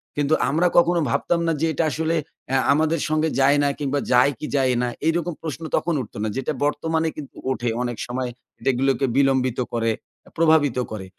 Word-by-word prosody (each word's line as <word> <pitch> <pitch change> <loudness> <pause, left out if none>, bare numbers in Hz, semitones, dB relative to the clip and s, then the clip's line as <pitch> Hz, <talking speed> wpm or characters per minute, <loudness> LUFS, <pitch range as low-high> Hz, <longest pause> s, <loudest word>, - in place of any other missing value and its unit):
কিন্তু 145 +1 +1 0.2
আমরা 165 +5 +2
কখনো 175 0 +4
ভাবতাম 170 +8 +1
না 165 - +2
যে, - - +3
এটা 160 - 0
আসলে 160 +2 -1 0.3
এ্যা 135 - +2 0.2
আমাদের 160 +2 +1
সঙ্গে 155 +1 +1
যায় 140 +2 +5
না - - +3
কিংবা 145 -1 -1
যায় 125 +3 +5
কি - - -4
যায় 130 -2 +3
না? 125 - 0 0.2
এরকম 170 +1 0
প্রশ্ন 160 0 -5
তখন 170 - 0
উঠত 110 - -10
না। - - 0
যেটা 135 - -1
বর্তমানে 160 +2 0
কিন্তু 145 -3 -9 0.2
ওঠে। 120 -2 -1
অনেক 120 -2 -3
সময় 125 +1 -3 0.4
এগুলোকে 135 +1 +1
বিলম্বিত 130 -3 +2
করে, 115 -1 +1 0.5
প্রভাবিত 155 -5 +3
করে। 105 -3 -5
145 Hz, 180 wpm, -23 LUFS, 130-160 Hz, 0.5 s, যায়